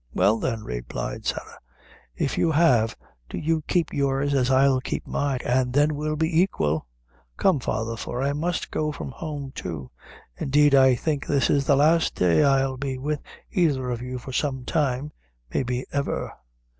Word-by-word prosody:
"Well, 110 +2 +3
then," 115 -3 -2
replied - - -5
Sarah, - - -4 0.6
"if 135 - -1
you 165 - +2
have, 125 -9 +3 0.3
do - - -5
you 160 0 0
keep 175 -2 0
yours 140 0 +1
as 130 -2 +2
I'll 135 0 +4
keep - - -4
mine, 135 -3 -1
and 125 0 +1
then 145 +2 +3
we'll 155 +1 -2
be 160 +2 +2
aiquil. 80 - 0 0.5
Come, 185 -7 +3
father, 115 -1 -2
for 120 +2 -5
I 140 +1 +1
must 165 +4 -2
go 155 0 -1
from 145 - -6
home 145 -2 -6
too. 75 -7 -6 0.5
Indeed 145 +1 +3
I 130 -2 +6
think 145 +2 -2
this 140 -3 +2
is 140 -1 +2
the 140 - +5
last 160 +4 +3
day 90 - +3
I'll 135 -1 +2
be 135 -1 -3
with 145 +2 -2 0.3
either 140 -8 +1
of 120 -1 -3
you 125 +1 -5
for 125 +1 -8
some 130 -2 -1
time 145 -2 0 0.4
maybe 125 -1 -1
ever." 140 0 -2
135 Hz, 170 wpm, -25 LUFS, 125-150 Hz, 0.6 s, I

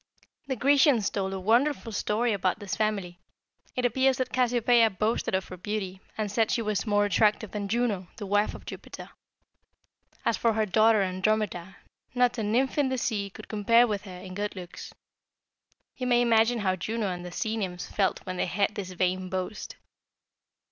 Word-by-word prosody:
"The 265 - -1
Grecians 275 -4 +4
told 190 -1 -2
a 195 - -4
wonderful 235 +5 +1
story 220 +3 0
about 185 -2 0
this 205 -3 -6
family. 200 -5 -2 0.6
It 250 - 0
appears 260 +2 +2
that 255 - -3
Cassiopeia 240 -2 +4
boasted 215 0 -1
of 190 - -2
her 185 - -8
beauty, 190 0 -4 0.2
and 215 -2 -2
said 220 +1 +2
she 230 - 0
was 215 0 -1
more 205 0 +3
attractive 210 +1 +2
than 205 -1 -3
Juno, 210 -4 0
the 210 - -5
wife 205 +2 +1
of - - -12
Jupiter. - - -9 1.1
As - - +2
for 230 -1 +2
her 220 0 +1
daughter 215 +1 +4
Andromeda, 190 -1 -1 0.4
not 245 -1 +2
a - - 0
nymph 245 +7 +1
in 280 -2 +2
the 260 - -1
sea 210 -5 -1
could - - -12
compare 230 +3 +4
with 210 -3 -3
her 185 -2 -9
in 185 0 -9
good 205 +2 -3
looks. 180 -2 -9 1.1
You 255 - -3
may 245 -1 +4
imagine 230 0 +3
how 190 -2 +1
Juno 215 +5 -3
and 175 -1 -5
the 180 - -7
sea 220 +5 -2
nymphs 185 -5 -3
felt 195 -2 -1
when 185 -1 -4
they - - 0
heard 200 +3 0
this 200 -3 -5
vain 185 +1 -1
boast! 185 +3 -4
210 Hz, 185 wpm, -27 LUFS, 190-235 Hz, 1.1 s, Grecians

